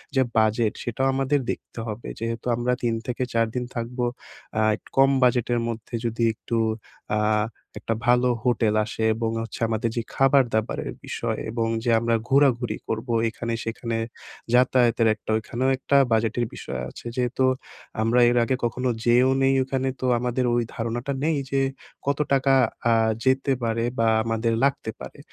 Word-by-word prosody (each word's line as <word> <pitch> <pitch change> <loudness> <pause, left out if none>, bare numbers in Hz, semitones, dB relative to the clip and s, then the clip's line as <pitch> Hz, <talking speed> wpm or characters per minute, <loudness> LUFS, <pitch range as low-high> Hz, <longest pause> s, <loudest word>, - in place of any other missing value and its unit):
যে 130 - +4 0.2
বাজেট 110 0 +2
সেটাও 125 +3 -1
আমাদের 135 +2 +1
দেখতে - - -8
হবে 110 +2 -6
যেহেতু 115 0 -4
আমরা 120 +1 0
৩ 120 -1 +1
থেকে 125 0 -2
৪ 115 0 +3
দিন 125 - -1
থাকবো, 120 +1 -3 0.6
আ - - +3 0.4
কম 135 0 +6
বাজেটের 120 -1 +2
মধ্যে 115 +1 -6
যদি 115 0 -1
একটু 115 - -5 0.6
আ - - +2 0.6
একটা 115 - -2
ভালো 125 +1 +4 0.2
হোটেল 115 -3 +2
আসে 110 +1 -4
এবং 115 0 -1
হচ্ছে 115 - -7
আমাদের 110 0 -1
যে - - +2
খাবার 135 0 +5
দাবারের 110 +1 -1
বিষয় - - -3
এবং 115 0 -1 0.2
যে 120 - +2
আমরা 115 0 +1
ঘোরাঘুরি 135 -3 +3
করবো 115 +2 -2 0.2
এখানে 115 +1 -4
সেখানে, 115 0 -3 0.6
যাতায়াতের 125 -2 +4
একটা 110 - -15
ওইখানেও 120 +4 -1
একটা 140 +1 +2
বাজেটের 115 +1 +1
বিষয় - - -6
আছে - - -13
যেহেতু 125 +1 +1 0.6
আমরা 115 +3 +3
এর 120 - +1
আগে 130 +3 +1
কখনো 125 +2 -1
যেয়েও 125 +2 +4
নেই 135 0 +4
ওখানে 135 0 -2
তো - - -1
আমাদের 125 +1 -1
ওই 120 0 +2
ধারণাটা 120 +3 -3
নেই 160 +1 +2 0.2
যে, 135 0 +2 0.4
কত 140 +1 0
টাকা 135 0 +3 0.4
আ - - +5 0.3
যেতে 135 +1 +2
পারে 115 0 0 0.2
বা 115 - +3 0.2
আমাদের 115 0 0
লাগতে 135 -5 +1
পারে। - - -9
120 Hz, 160 wpm, -24 LUFS, 115-130 Hz, 0.6 s, কম